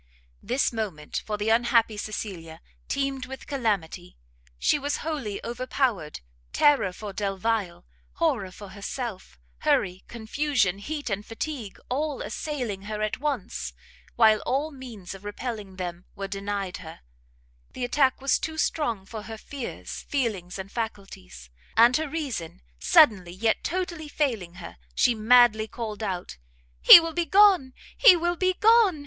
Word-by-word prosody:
This 250 +3 0
moment, 195 -10 -4
for 210 -1 -2
the 210 +1 -1
unhappy 230 -1 +3
Cecilia, 190 -6 -6 0.3
teemed 275 -2 -2
with 265 0 -9
calamity; 200 - -2 0.4
she 290 - +2
was 285 +1 -1
wholly 270 -11 -3
overpowered; 240 - -2 0.3
terror 290 -10 +4
for 205 +2 -8
Delvile, 195 -2 -2 0.3
horror 270 - 0
for 200 +2 -11
herself, 200 - -6 0.2
hurry, 185 -1 +1
confusion, 230 -4 0
heat 290 +2 -5
and 200 +1 -2
fatigue, 230 -1 -6
all 290 +2 -2
assailing 235 -3 -4
her 215 0 -3
at 215 +3 -2
once, 290 0 -3 0.4
while 220 -2 +5
all 280 +8 -1
means 240 -10 -9
of 195 0 -12
repelling 205 -2 -6
them 175 -1 -6
were 195 -1 -4
denied 195 -1 -4
her, 160 -3 -11 0.7
the 250 - -3
attack 260 +1 +2
was 275 0 +2
too 315 0 -5
strong 235 -12 -1
for 220 +2 -7
her 220 +1 -8
fears, 270 +2 -7
feelings, 210 -11 -2
and 190 +1 -7
faculties, 195 - -7 0.3
and 235 +2 +7
her 315 -1 -3
reason 260 - -5 0.2
suddenly, 190 - +5
yet 220 +4 0
totally 340 -2 -3
failing 230 - -2
her, 175 - -10 0.2
she 245 - +4
madly 220 -1 +5
called 220 -1 -6
out, 185 - -4 0.4
"He - - +12
will 330 -1 -4
be 345 0 0
gone! 380 -9 +5 0.2
he - - +8
will 345 +1 0
be 370 +1 +1
gone! 435 -6 +5
225 Hz, 140 wpm, -26 LUFS, 195-280 Hz, 0.7 s, He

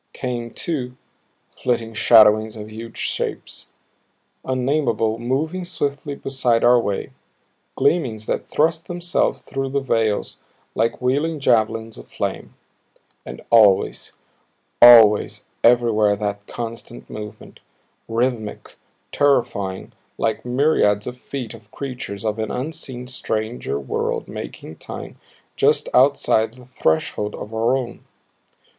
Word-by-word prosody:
Came, 120 -2 -4
too, 125 -4 -4 0.6
flitting 115 -2 -1
shadowings 110 -1 +5
of 105 0 -8
huge 115 +1 -9
shapes, - - -4 0.8
unnameable, 125 -4 0
moving 150 +9 -2
swiftly 145 -4 -3
beside 130 -4 0
our 120 0 +6
way; 100 -4 -3 0.6
gleamings 120 -11 +1
that - - -2
thrust 160 +2 +1
themselves 175 0 -1
through 135 0 -3
the 140 +1 0
veils 115 -6 -1 0.3
like 115 +3 0
wheeling 145 +5 0
javelins 115 -3 +1
of - - -13
flame. - - -4 0.7
And - - -8
always, 105 -5 +4 0.7
always, 115 -3 +7 0.2
everywhere 115 -3 +4
that 100 0 -4
constant 115 0 -7
movement, 105 -1 -9 0.5
rhythmic, 115 -2 -2 0.3
terrifying 120 -9 0 0.3
like 110 -1 -1
myriads 125 -6 +2
of 125 - -5
feet 125 -2 -6
of 110 -2 -15
creatures 120 -6 -6
of 110 0 -1
an 110 -1 -2
unseen, 130 -2 -5
stranger 110 - -3
world 70 - -3
marking 80 - -8
time - - -8 0.4
just - - +2
outside 125 -4 +3
the 125 -1 -15
threshold 105 -1 -1
of 105 - -8
our 115 +4 +2
own. 125 -3 -6
120 Hz, 115 wpm, -21 LUFS, 110-130 Hz, 0.8 s, always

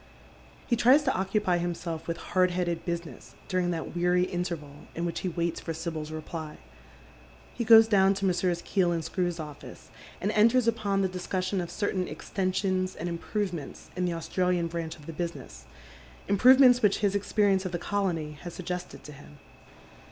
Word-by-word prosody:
He 240 - +1
tries 260 +6 +5
to 265 - +1
occupy 190 -1 0
himself 170 -2 -4
with 170 - -2 0.2
hard 185 -1 +4
headed 175 -2 -2
business 170 -1 -6
during 185 -1 0
that 170 0 -4
weary 180 +1 +2
interval 170 -6 -5
in 170 - -2
which 170 - -2
he 185 - -2
waits 170 -1 -2
for 165 - -5
Sibyl's 160 -2 -4
reply. 155 0 -6 1.0
He 240 - -3
goes 225 0 +8
♦lown 195 -2 +4
to 195 0 -2
Messrs. 175 -1 0
Keel 185 -3 +1
and 165 -1 -1
Skrew's 175 -1 -2
office, 150 -2 -10 0.3
and 200 - -1
enters 230 +3 +4
upon 205 -4 +1
the - - +2
discussion 185 +1 -2
of 175 - -5
certain 190 -3 -2
extensions 185 +3 -1
and 170 - -4
improvements 170 -2 -4
in 180 0 -1
the 175 - -1
Australian 180 +1 0
branch 165 -1 -4
of 150 - -16
the 165 - -7
business, 150 - -6 0.6
improvements 250 +4 +6
which 210 -2 +3
his 200 0 +1
ex 200 - -3
perience 200 -3 +3
of 185 - -4
the 175 - -1
colony 175 -5 -2
has 175 -1 -8
suggested 180 0 -6
to 150 - -10
him. 145 +1 -14
180 Hz, 175 wpm, -28 LUFS, 170-195 Hz, 1.0 s, goes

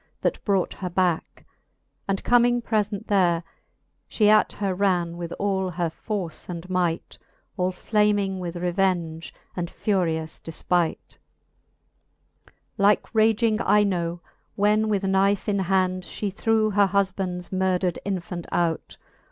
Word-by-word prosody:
That - - -1
brought 195 -3 +1
her 185 - -5
backe. 175 -2 -1 0.6
And 195 -1 -1
comming 245 0 +4
preient 215 -2 -1
there„ 175 -4 +2 0.7
She 210 -1 +4
at 215 0 +4
her 195 -2 -1
ran 180 -3 +1
with 170 -1 -6
all 190 -2 -1
her 175 -1 -2
force 185 -2 -5
and 175 0 -6
might, 175 -2 -1 0.4
All 185 -2 0
flaming 205 -1 +1
with 175 -1 -5
revenge 175 -2 -1 0.2
and 175 -2 -3
furious 165 -6 -1
defpight. 165 +1 -2
XLVII. - - -37 0.3
Like 200 +3 +3
raging 220 0 +3
Ino^ 175 -6 +1 0.3
when 210 +1 +2
with" 205 -2 0
knife 195 +1 +2
in 200 -1 +1
hand 185 0 +1
She 200 +2 -4
threw 220 +1 +1
her 200 0 +4
hufband's 190 -2 -1
murdred 185 -1 0
infant 180 -2 -4
out 170 -2 -1
190 Hz, 125 wpm, -24 LUFS, 175-205 Hz, 0.7 s, comming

